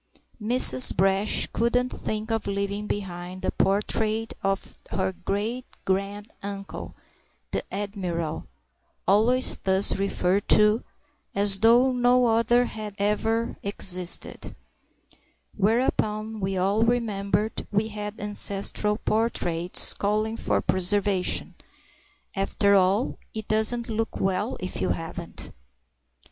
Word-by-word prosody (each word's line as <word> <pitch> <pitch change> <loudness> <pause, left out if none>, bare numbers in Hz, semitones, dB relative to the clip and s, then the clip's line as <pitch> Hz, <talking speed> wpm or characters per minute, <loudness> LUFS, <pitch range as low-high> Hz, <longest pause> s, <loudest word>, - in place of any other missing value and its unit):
Mrs. 210 - +7
Brash 195 +3 +2
couldn't 245 +2 0
think 215 -1 -5
of 225 -2 -2
leaving 200 +1 -3
behind 185 -2 -6
the - - -1
portrait 215 +2 -1
of 195 0 -3
her 190 -1 -2
great 215 +7 -4 0.2
grand 200 +2 -3
uncle, 200 0 -8 0.6
the - - -2
admiral 180 -6 -4 0.6
(always 235 +6 +5
thus 190 +1 +2
referred 195 0 -1
to, 210 +2 +5 0.5
as 200 -1 +5
though 240 +4 +4
no 250 0 +2
other 230 +2 +2
had 215 -3 -7
ever 220 +3 -1
existed), 185 -3 0 1.0
whereupon 215 0 -1
we 190 -1 -3
all 195 +4 0
remembered 215 -3 -1
we 210 +1 0
had 210 0 -7
ancestral 205 0 +1
portraits 180 -7 +1
calling 215 +2 -2
for - - -1
preservation—after 195 +1 -1
all, 195 +5 +1 0.2
it 220 -1 -6
doesn't 220 +2 -1
look 225 0 -4
well 195 +5 -2
if 185 - -6
you - - -1
haven't! 165 +1 -6
205 Hz, 105 wpm, -24 LUFS, 195-225 Hz, 1.0 s, Mrs